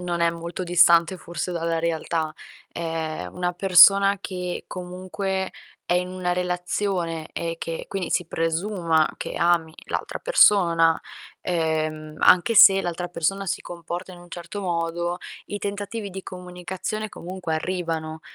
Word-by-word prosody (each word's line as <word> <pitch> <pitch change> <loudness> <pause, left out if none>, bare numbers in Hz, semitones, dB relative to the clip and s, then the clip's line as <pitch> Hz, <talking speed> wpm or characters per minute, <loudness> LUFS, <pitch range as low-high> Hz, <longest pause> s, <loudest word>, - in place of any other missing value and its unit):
non 175 -1 -2
è 170 0 +4
molto 170 +2 -6
distante 170 0 +5
forse 175 +1 -5
dalla 165 -1 -1
realtà. 160 -1 -1 0.4
Ehm, 160 - -4
una 180 0 -1
persona 195 +2 +6
che 180 -2 -5
comunque 185 +1 -4 0.4
è - - +4
in 180 0 +1
una 185 -1 -2
relazione, 180 -2 -2
e 165 0 -3
che 165 -1 -5
quindi 190 -3 -3
si 180 - +1
presuma 165 -1 0
che - - -5
ami 170 -2 +1
l'altra - - -4
persona, 170 - +4 0.4
ehm, 155 -2 -2
anche 185 +6 +5
se 195 -2 +9
l'altra 175 0 -3
persona 180 +4 -1
si 185 - -2
comporta 175 +1 -7
in 175 - -12
un 175 - -15
certo 175 +4 -7
modo, 175 -1 -2 0.3
i 205 - -4
tentativi 205 +1 -4
di 190 +1 -7
comunicazione, 185 +4 -5
comunque, 180 -3 -5
arrivano, 160 -2 -3
175 Hz, 135 wpm, -24 LUFS, 165-185 Hz, 0.4 s, se